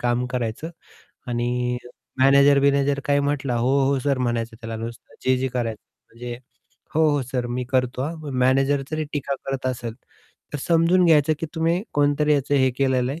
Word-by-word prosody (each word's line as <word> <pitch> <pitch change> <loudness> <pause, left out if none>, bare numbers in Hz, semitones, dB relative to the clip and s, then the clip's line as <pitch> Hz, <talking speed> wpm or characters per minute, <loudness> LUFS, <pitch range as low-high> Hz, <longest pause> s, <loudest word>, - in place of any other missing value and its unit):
काम 120 +1 0
करायचं 125 +5 -3 0.6
आणि 125 +1 -1 0.4
मॅनेजर-बिनेजर 140 +1 +4
काय 145 0 +2
म्हटला 140 -3 -1
"हो, 120 +3 +1 0.2
हो, 140 0 +2
सर" 140 0 0
म्हणायचं 120 -2 -2
त्याला 115 0 -5
नुसतं 115 +1 -8
जे-जे 130 0 +2
करायचं 120 -4 -3 0.3
म्हणजे 120 +1 -6 0.6
"हो, 160 0 +4
हो 145 -1 +1
सर 125 -2 -1
मी 125 +1 -3
करतो 125 -1 0
हां." 155 0 -5
मॅनेजर 135 +2 +3
जरी 155 0 -2
टीका 140 -1 -2
करत 135 -1 -3
असेल, 120 -3 -3 0.6
तर 145 - -3
समजून 170 +2 +4
घ्यायचं 155 -1 +4
की 165 - -2
तुम्ही 165 +2 +1
कोणतरी 145 +1 +3
याचं 145 0 0
हे 130 -2 +3
केलेलं 130 -1 +1
आहे 160 - -7
135 Hz, 165 wpm, -23 LUFS, 125-145 Hz, 0.6 s, मॅनेजर-बिनेजर